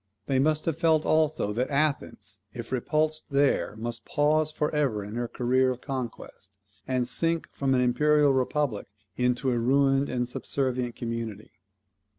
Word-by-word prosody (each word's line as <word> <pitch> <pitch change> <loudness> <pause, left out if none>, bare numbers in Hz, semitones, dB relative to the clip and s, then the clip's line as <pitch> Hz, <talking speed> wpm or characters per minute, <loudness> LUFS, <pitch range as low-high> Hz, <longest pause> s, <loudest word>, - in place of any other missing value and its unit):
They 130 +2 +1
must 155 +2 +1
have 165 -1 -1
felt 160 -2 +3
also 155 -9 +2
that 125 +4 -1
Athens, 145 0 -1 0.2
if - - -7
repulsed 155 +4 0
there, 140 -6 +1
must 115 +1 -4
pause 155 +1 +1
for 150 0 -2
ever 135 -9 0
in 105 +1 -8
her 120 +1 -2
career 130 +2 +1
of 125 -1 -4
conquest, 120 -7 -6 0.3
and 125 -2 0
sink 165 +6 0
from 135 -1 0
an 125 - +3
imperial 145 +3 +3
republic 130 -3 0 0.3
into 125 +1 +1
a 120 - +1
ruined 135 +3 +3
and 125 -1 -1
subservient 125 -1 -2
community. 115 -3 -5
130 Hz, 155 wpm, -27 LUFS, 120-150 Hz, 0.3 s, felt